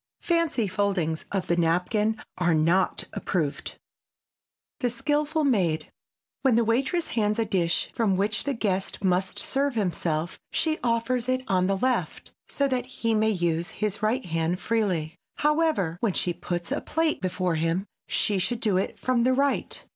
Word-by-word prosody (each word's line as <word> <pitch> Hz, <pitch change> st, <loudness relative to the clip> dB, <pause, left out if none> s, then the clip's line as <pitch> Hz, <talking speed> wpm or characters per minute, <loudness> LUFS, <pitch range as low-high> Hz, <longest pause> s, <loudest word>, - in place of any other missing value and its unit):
Fancy 335 Hz, -, +1 dB
foldings 185 Hz, -5 st, -1 dB
of 195 Hz, -2 st, -1 dB
the 175 Hz, -, +1 dB
napkin 180 Hz, +6 st, +1 dB, 0.2 s
are 175 Hz, -2 st, +2 dB
not 170 Hz, +4 st, +2 dB
approved. 160 Hz, -7 st, -2 dB
[Sidenote: -, -, -7 dB, 1.0 s
THE 250 Hz, -3 st, +1 dB
SKILFUL 295 Hz, +5 st, 0 dB
MAID] 175 Hz, -, +1 dB, 0.5 s
When 265 Hz, -4 st, +4 dB
the 235 Hz, -, +4 dB
waitress 270 Hz, +9 st, +1 dB
hands 210 Hz, -1 st, +1 dB
a 225 Hz, -, +1 dB
dish 170 Hz, -5 st, 0 dB
from 215 Hz, -5 st, +2 dB
which 210 Hz, +3 st, 0 dB
the 280 Hz, -1 st, -1 dB
guest 195 Hz, -3 st, -2 dB
must 185 Hz, 0 st, +1 dB
serve 275 Hz, -1 st, 0 dB
himself 170 Hz, -5 st, -1 dB
she 315 Hz, -1 st, 0 dB
offers 240 Hz, +1 st, 0 dB
it 255 Hz, 0 st, +1 dB
on 185 Hz, -1 st, +2 dB
the 195 Hz, 0 st, +1 dB
left 255 Hz, +5 st, -1 dB, 0.2 s
so 280 Hz, -, 0 dB
that 255 Hz, -2 st, -1 dB
he 230 Hz, -3 st, -1 dB
may 220 Hz, 0 st, +3 dB
use 175 Hz, -3 st, 0 dB
his 210 Hz, -1 st, -1 dB
right 225 Hz, +5 st, +1 dB
hand 165 Hz, +1 st, -1 dB
freely. 185 Hz, -9 st, -1 dB, 0.2 s
However, 300 Hz, -, +1 dB
when 215 Hz, -4 st, +1 dB
she 175 Hz, -, 0 dB
puts 175 Hz, +4 st, -4 dB
a 285 Hz, -, 0 dB
plate 320 Hz, 0 st, 0 dB
before 185 Hz, -1 st, 0 dB
him, 165 Hz, +4 st, 0 dB, 0.2 s
she 205 Hz, -2 st, +1 dB
should 230 Hz, +6 st, -1 dB
do 210 Hz, -5 st, +1 dB
it 190 Hz, -, -2 dB
from 255 Hz, -2 st, +1 dB
the 255 Hz, +2 st, +3 dB
right. 275 Hz, +1 st, 0 dB
210 Hz, 165 wpm, -26 LUFS, 180-255 Hz, 1.0 s, When